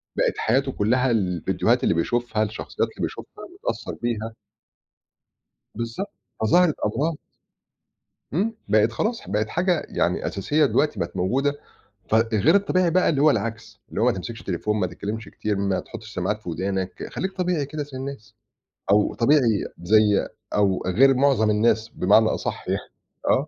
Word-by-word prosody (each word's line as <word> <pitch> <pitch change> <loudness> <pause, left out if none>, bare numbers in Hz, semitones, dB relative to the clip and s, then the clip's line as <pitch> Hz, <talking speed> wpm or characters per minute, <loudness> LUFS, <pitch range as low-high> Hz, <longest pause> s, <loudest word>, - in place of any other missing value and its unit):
بقت - - +1
حياته 135 +4 +1
كلّها 125 +5 +1
الفيديوهات 90 -7 +1
اللي - - +3
بيشوفها 110 +5 0
الشخصيات 110 0 -2
اللي - - -9
بيشوفها - - -6 0.2
متأثّر - - -3
بيها. 115 -1 -2 1.4
بالضبط. 115 - -4 0.3
فظهرت 160 +8 +4
أمراض. 150 +9 0 1.2
إمم 220 +6 0
بقت 110 +2 +3
خلاص 225 - -1
ح - - -14
بقت 105 +1 0
حاجة 180 -1 0
يعني - - 0
أساسية 145 +11 +1
دلوقتي 150 +3 +1
بقت 85 +2 -3
موجودة 130 +11 +1 0.6
ف - - +2
غير 110 - +3
الطبيعي 185 -3 +3
بقى 185 +2 +3
اللي 140 -4 +1
هو 155 - +6
العكس، 115 -1 -3
اللي - - -3
هو 115 - +3
ما 125 - +4
تمسكش 115 +5 -6
التليفون، 105 +4 -2
ما 90 - +2
تتكلّمش 105 +6 -6
كتير، 105 -2 -3
ما 100 -1 0
تحطّش 110 -1 -10
سماعات 105 +4 -1
في 90 - -9
ودانك، 95 +2 -3
خلّيك 190 +1 -3
طبيعي 180 -6 -1
كده 150 +1 -4
زي 140 -2 -8
الناس، 130 -5 -7 0.6
أو 105 0 +3
طبيعي 120 -4 +3 0.2
زي 105 +1 +4 0.3
أو 100 -2 +2
غير 135 +9 +5
مُعظم 130 -5 +3
الناس 110 +1 +2
بمعنى 105 +3 +4
أصح - - -3
يعني. - - 0 0.5
آه. 140 +4 +3
115 Hz, 155 wpm, -24 LUFS, 105-140 Hz, 1.4 s, هو